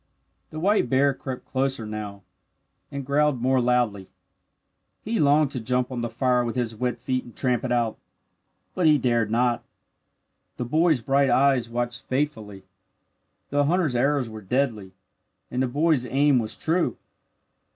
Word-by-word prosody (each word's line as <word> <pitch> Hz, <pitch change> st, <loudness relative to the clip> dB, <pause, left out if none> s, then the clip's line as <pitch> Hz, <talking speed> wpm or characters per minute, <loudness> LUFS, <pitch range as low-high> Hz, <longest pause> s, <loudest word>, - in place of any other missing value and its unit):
The 155 Hz, -, -7 dB
white 195 Hz, -, +2 dB
bear 140 Hz, +2 st, +3 dB
crept 130 Hz, -1 st, -7 dB
closer 130 Hz, -3 st, -1 dB
now, 105 Hz, -2 st, -6 dB, 0.7 s
and 140 Hz, -1 st, -5 dB
growled 145 Hz, -1 st, +2 dB
more 130 Hz, +1 st, +2 dB
loudly. 120 Hz, -6 st, 0 dB, 1.0 s
He 225 Hz, 0 st, -2 dB
longed 145 Hz, 0 st, +3 dB
to 130 Hz, -, -3 dB
jump 125 Hz, +2 st, -1 dB
on 125 Hz, -2 st, -3 dB
the 120 Hz, -, -2 dB
fire 125 Hz, -1 st, +1 dB
with 120 Hz, 0 st, -3 dB
his 120 Hz, -3 st, -2 dB
wet 125 Hz, +2 st, -2 dB
feet 130 Hz, -1 st, -2 dB
and 120 Hz, -, -14 dB
tramp 125 Hz, -3 st, 0 dB
it 130 Hz, -, -3 dB
out. 120 Hz, -2 st, 0 dB, 0.7 s
But 180 Hz, -3 st, +2 dB
he 150 Hz, -1 st, +6 dB
dared 120 Hz, -4 st, +1 dB
not. 120 Hz, +1 st, +1 dB, 0.9 s
The 125 Hz, -, -3 dB
boy's 155 Hz, +1 st, +2 dB
bright 135 Hz, +3 st, +2 dB
eyes 130 Hz, -1 st, +3 dB
watched 120 Hz, 0 st, -3 dB
faithfully. 110 Hz, -8 st, -3 dB, 0.9 s
The 145 Hz, 0 st, +2 dB
hunter's 160 Hz, -4 st, +1 dB
arrows 135 Hz, +1 st, +1 dB
were 110 Hz, -1 st, -9 dB
deadly, 110 Hz, -3 st, -1 dB, 0.6 s
and 125 Hz, -, -1 dB
the 130 Hz, -, +1 dB
boy's 145 Hz, -1 st, +1 dB
aim 140 Hz, -1 st, +3 dB
was 110 Hz, -1 st, -3 dB
true. 170 Hz, +2 st, 0 dB
125 Hz, 155 wpm, -24 LUFS, 120-140 Hz, 1.0 s, he